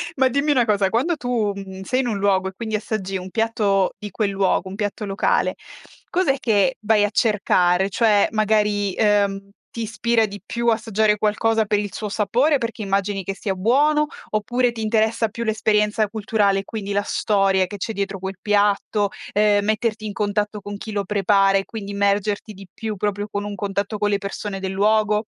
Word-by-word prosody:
ma 265 Hz, -1 st, +3 dB
dimmi 280 Hz, +3 st, +1 dB
una 255 Hz, -4 st, +4 dB
cosa, 200 Hz, -3 st, +2 dB
quando 300 Hz, -, 0 dB
tu 240 Hz, -5 st, -1 dB
mhmm, 190 Hz, -1 st, -8 dB
sei 255 Hz, +7 st, -1 dB
in 260 Hz, -, 0 dB
un 215 Hz, -4 st, -1 dB
luogo 195 Hz, -1 st, +1 dB
e 190 Hz, -, -6 dB
quindi 220 Hz, +1 st, -3 dB
assaggi 200 Hz, -3 st, -3 dB
un 185 Hz, +1 st, -7 dB
piatto 210 Hz, -3 st, +1 dB
di 210 Hz, -, -6 dB
quel 205 Hz, +1 st, -1 dB
luogo, 195 Hz, -1 st, 0 dB
un 190 Hz, -, -7 dB
piatto 205 Hz, 0 st, -3 dB
locale, 195 Hz, +1 st, 0 dB, 0.5 s
cos'è 345 Hz, -7 st, +1 dB
che 235 Hz, +2 st, +2 dB
vai 215 Hz, -1 st, +3 dB
a 205 Hz, -, +2 dB
cercare? 195 Hz, -4 st, +2 dB
Cioè 210 Hz, 0 st, +3 dB
magari, 210 Hz, -2 st, +1 dB
ehm, 200 Hz, -2 st, +1 dB, 0.2 s
ti 230 Hz, -, -5 dB
ispira 225 Hz, +1 st, +1 dB
di 205 Hz, 0 st, -8 dB
più 235 Hz, 0 st, -3 dB
assaggiare 220 Hz, -2 st, +2 dB
qualcosa 220 Hz, +1 st, +1 dB
per 205 Hz, 0 st, +1 dB
il 205 Hz, -1 st, -4 dB
suo 210 Hz, +3 st, -5 dB
sapore, 240 Hz, +8 st, +1 dB
perché 230 Hz, -2 st, -4 dB
immagini 195 Hz, 0 st, -1 dB
che 195 Hz, -, -3 dB
sia 195 Hz, -1 st, -3 dB
buono 290 Hz, +10 st, +3 dB, 0.2 s
oppure 240 Hz, +4 st, 0 dB
ti 225 Hz, -1 st, -6 dB
interessa 220 Hz, +1 st, +1 dB
più 235 Hz, +3 st, -5 dB
l'esperienza 215 Hz, -1 st, +1 dB
culturale 205 Hz, -2 st, +1 dB
e -, -, -5 dB
quindi 205 Hz, -1 st, -6 dB
la 200 Hz, 0 st, +1 dB
storia 195 Hz, -2 st, +1 dB
che 205 Hz, +3 st, -8 dB
c'è 200 Hz, -, -3 dB
dietro 200 Hz, -2 st, -3 dB
quel 190 Hz, 0 st, -5 dB
piatto, 205 Hz, 0 st, +1 dB, 0.2 s
ehm 205 Hz, -1 st, +3 dB
metterti 215 Hz, 0 st, -1 dB
in 210 Hz, -, -4 dB
contatto 210 Hz, +1 st, -1 dB
con 205 Hz, +1 st, -7 dB
chi 220 Hz, -, -7 dB
lo 205 Hz, -1 st, -1 dB
prepara 195 Hz, 0 st, +3 dB
e 195 Hz, -, -2 dB
quindi 210 Hz, -3 st, -7 dB
immergerti 200 Hz, +1 st, 0 dB
di 195 Hz, -1 st, -12 dB
più 220 Hz, -2 st, -5 dB
proprio 205 Hz, +1 st, -2 dB
con 205 Hz, -1 st, -4 dB
un 205 Hz, -, -5 dB
contatto 200 Hz, +2 st, -3 dB
con 205 Hz, 0 st, 0 dB
le 200 Hz, -, +1 dB
persone 200 Hz, 0 st, -5 dB
del 190 Hz, 0 st, -3 dB
luogo? 210 Hz, +2 st, +2 dB
210 Hz, 195 wpm, -22 LUFS, 200-220 Hz, 0.5 s, una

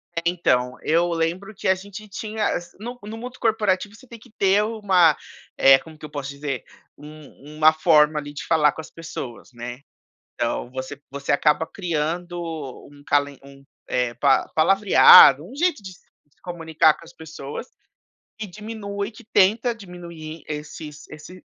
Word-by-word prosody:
É, 170 Hz, -, -1 dB
então, 125 Hz, -8 st, +1 dB
eu 170 Hz, +3 st, +2 dB
lembro 170 Hz, +5 st, -2 dB
que -, -, -4 dB
a 190 Hz, -, +5 dB
gente 200 Hz, +3 st, -10 dB
tinha 215 Hz, +1 st, -3 dB
assi 175 Hz, 0 st, -7 dB
no 240 Hz, +3 st, -7 dB
no 215 Hz, +2 st, -7 dB
mundo 250 Hz, +2 st, -9 dB
corporativo 210 Hz, -2 st, 0 dB
você 260 Hz, -, -17 dB
tem 235 Hz, -1 st, -12 dB
que 245 Hz, -, -18 dB
ter 200 Hz, -1 st, +2 dB
uma, 195 Hz, -8 st, +3 dB, 0.4 s
eh, 135 Hz, 0 st, +7 dB
como 160 Hz, -1 st, -14 dB
que 155 Hz, -, -10 dB
eu -, -, -9 dB
posso 140 Hz, -2 st, -5 dB
dizer, 140 Hz, -3 st, -5 dB, 0.3 s
um 150 Hz, 0 st, -13 dB
uma 155 Hz, 0 st, +6 dB
forma 155 Hz, -1 st, +4 dB
ali 145 Hz, 0 st, -8 dB
de 145 Hz, -, -7 dB
falar 150 Hz, -3 st, +3 dB
com -, -, -7 dB
as 155 Hz, -, -14 dB
pessoas, 155 Hz, -8 st, -8 dB
né. 120 Hz, +2 st, -8 dB, 0.5 s
Então 120 Hz, -, -2 dB
você 130 Hz, +2 st, -6 dB
você 140 Hz, 0 st, -3 dB
acaba 150 Hz, +2 st, +2 dB
criando 175 Hz, 0 st, -3 dB, 0.5 s
um 145 Hz, 0 st, -17 dB
calen 145 Hz, -1 st, 0 dB
um 140 Hz, 0 st, -15 dB, 0.3 s
eh, 125 Hz, -1 st, -1 dB
pa 135 Hz, +3 st, +2 dB
palavreado, 170 Hz, -4 st, +7 dB
um 245 Hz, -, -12 dB
jeito 325 Hz, -, 0 dB
de 190 Hz, -1 st, -9 dB
se 180 Hz, -, -19 dB, 0.4 s
comunicar 160 Hz, -3 st, +2 dB
com 170 Hz, -, -15 dB
as 165 Hz, -, -15 dB
pessoas, 160 Hz, -, -8 dB, 0.7 s
e 220 Hz, -, -5 dB
diminui 205 Hz, 0 st, -6 dB
que 235 Hz, +1 st, -15 dB
tenta 225 Hz, +4 st, +2 dB
diminuir 170 Hz, -6 st, -10 dB
esses 150 Hz, 0 st, -8 dB
esse 165 Hz, +4 st, -12 dB
165 Hz, 165 wpm, -23 LUFS, 150-200 Hz, 0.7 s, eh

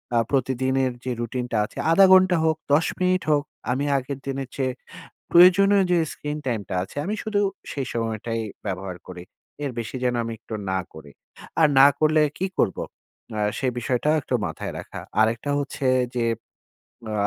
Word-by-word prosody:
আ -, -, +4 dB
প্রতিদিনের 130 Hz, 0 st, +1 dB
যে 130 Hz, -, -1 dB
রুটিনটা 120 Hz, 0 st, -3 dB
আছে -, -, -15 dB
১/২ 195 Hz, +4 st, +7 dB
ঘন্টা 185 Hz, -2 st, +6 dB
হোক, 160 Hz, -1 st, +2 dB, 0.2 s
১০ 160 Hz, +3 st, +4 dB
মিনিট 185 Hz, 0 st, +2 dB
হোক। 145 Hz, -1 st, +3 dB, 0.3 s
আমি 135 Hz, +3 st, 0 dB
আগের 135 Hz, +1 st, -4 dB
দিনের 135 Hz, -1 st, -3 dB
চেয়ে 130 Hz, -2 st, -1 dB, 0.6 s
প্রয়োজনীয় 195 Hz, +3 st, +7 dB
যে 175 Hz, -, +4 dB
স্ক্রিন 150 Hz, 0 st, -5 dB
টাইমটা 110 Hz, -7 st, -2 dB
আছে, 95 Hz, -, -10 dB
আমি 210 Hz, -, -1 dB
শুধু 215 Hz, -2 st, 0 dB, 0.3 s
সেই 135 Hz, -3 st, -3 dB
সময়টাই 115 Hz, 0 st, -2 dB, 0.3 s
ব্যবহার 95 Hz, -2 st, -4 dB
করি। 90 Hz, -1 st, -8 dB, 0.4 s
এর 140 Hz, -, -1 dB
বেশি 115 Hz, +2 st, -4 dB
যেন 125 Hz, -1 st, +1 dB
আমি 115 Hz, -, -4 dB
একটু 110 Hz, -, -8 dB, 0.2 s
না 95 Hz, -, +1 dB, 0.2 s
করি। 75 Hz, -2 st, -12 dB, 0.5 s
আর 155 Hz, -, +6 dB
না 135 Hz, -, +10 dB
করলে 155 Hz, 0 st, +4 dB, 0.2 s
কী 190 Hz, -, 0 dB
করব? 95 Hz, -, +1 dB, 0.6 s
আ -, -, 0 dB, 0.2 s
সে 135 Hz, -, -1 dB
বিষয়টা 125 Hz, +4 st, 0 dB
একটু 130 Hz, -, -4 dB
মাথায় 80 Hz, -2 st, -5 dB
রাখা। -, -, -8 dB, 0.2 s
আরেকটা 115 Hz, +5 st, +1 dB
হচ্ছে 140 Hz, -1 st, -3 dB, 0.3 s
যে 120 Hz, -, +1 dB, 0.9 s
আ -, -, -3 dB
130 Hz, 165 wpm, -24 LUFS, 115-155 Hz, 0.9 s, না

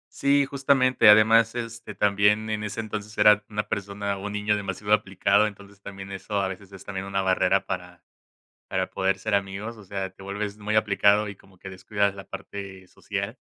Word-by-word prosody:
Sí, 140 Hz, 0 st, +3 dB
justamente, 135 Hz, -4 st, +3 dB
además, 115 Hz, +2 st, +6 dB
este, 115 Hz, -3 st, -6 dB
también 105 Hz, +2 st, +2 dB
en 105 Hz, 0 st, -2 dB
ese 105 Hz, +2 st, -3 dB
entonces 105 Hz, 0 st, -6 dB
era 105 Hz, 0 st, +6 dB
una 105 Hz, 0 st, -3 dB
persona 100 Hz, 0 st, -3 dB
un 100 Hz, +1 st, -6 dB
niño 105 Hz, 0 st, +1 dB
demasiado 105 Hz, +1 st, -2 dB
aplicado, 100 Hz, +1 st, +3 dB
entonces, 100 Hz, -1 st, -12 dB
también 95 Hz, 0 st, -9 dB
eso 100 Hz, +2 st, -3 dB
a 95 Hz, -, 0 dB
veces 95 Hz, +1 st, -8 dB
es 95 Hz, -1 st, -12 dB
también 95 Hz, -1 st, -5 dB
una 95 Hz, 0 st, -1 dB
barrera 95 Hz, +1 st, +2 dB
para 90 Hz, -2 st, -6 dB, 0.7 s
para 95 Hz, 0 st, -1 dB
poder 95 Hz, 0 st, 0 dB
ser 110 Hz, +1 st, -3 dB
amigos, 100 Hz, +4 st, -3 dB
o 105 Hz, -, -13 dB
sea, 95 Hz, -1 st, -4 dB
te 95 Hz, -, -18 dB
vuelves 100 Hz, +1 st, -4 dB
muy 105 Hz, +1 st, -2 dB
aplicado 105 Hz, 0 st, +3 dB
y 100 Hz, -, -7 dB
como 95 Hz, -1 st, -22 dB
que 95 Hz, -, -9 dB
descuidas 100 Hz, +1 st, -1 dB
la 95 Hz, -, -8 dB
parte 95 Hz, -2 st, -8 dB
social. 100 Hz, +6 st, -5 dB
100 Hz, 185 wpm, -25 LUFS, 95-105 Hz, 0.7 s, además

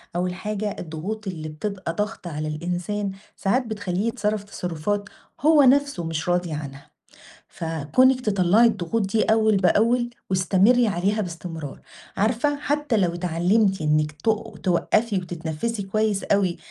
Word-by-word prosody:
أول 180 Hz, +1 st, 0 dB
حاجة 210 Hz, +2 st, -3 dB
الضغوط 185 Hz, +7 st, -5 dB
اللي 155 Hz, -4 st, -5 dB
بتبقى 185 Hz, +2 st, -4 dB
ضاغطة 205 Hz, -1 st, -3 dB
على 155 Hz, 0 st, -3 dB
الإنسان، 180 Hz, +6 st, -3 dB, 0.2 s
ساعات 250 Hz, +6 st, +1 dB
بتخليه 205 Hz, -2 st, -2 dB
يتصرف 215 Hz, -3 st, -1 dB
تصرفات 200 Hz, +2 st, -3 dB, 0.3 s
هو 305 Hz, 0 st, +6 dB
نَفسه 280 Hz, -7 st, +3 dB
مش 160 Hz, +1 st, -3 dB
راضي 175 Hz, -1 st, +1 dB
عنها، 140 Hz, -2 st, -7 dB, 0.6 s
فكونِك 165 Hz, -, +2 dB
تطلّعي 205 Hz, 0 st, +4 dB
الضغوط 215 Hz, 0 st, 0 dB
دي 215 Hz, +3 st, +1 dB
أول 220 Hz, -1 st, +3 dB
بأول 230 Hz, +6 st, +3 dB, 0.2 s
واستمري 195 Hz, +6 st, +4 dB
عليها 200 Hz, +3 st, 0 dB
باستمرار، 165 Hz, -5 st, -6 dB, 0.4 s
عارفة 235 Hz, +8 st, +1 dB
حتّى 290 Hz, -3 st, 0 dB
لو 180 Hz, -4 st, +1 dB
اتعلمتِ 180 Hz, +4 st, +1 dB
إنِك 150 Hz, 0 st, +2 dB
ت 150 Hz, -, -24 dB, 0.4 s
توقّفي 205 Hz, +4 st, +2 dB
وتتنفسي 175 Hz, +4 st, -3 dB
كويس 210 Hz, +1 st, 0 dB
أوي 190 Hz, -4 st, +1 dB
195 Hz, 130 wpm, -24 LUFS, 170-220 Hz, 0.6 s, هو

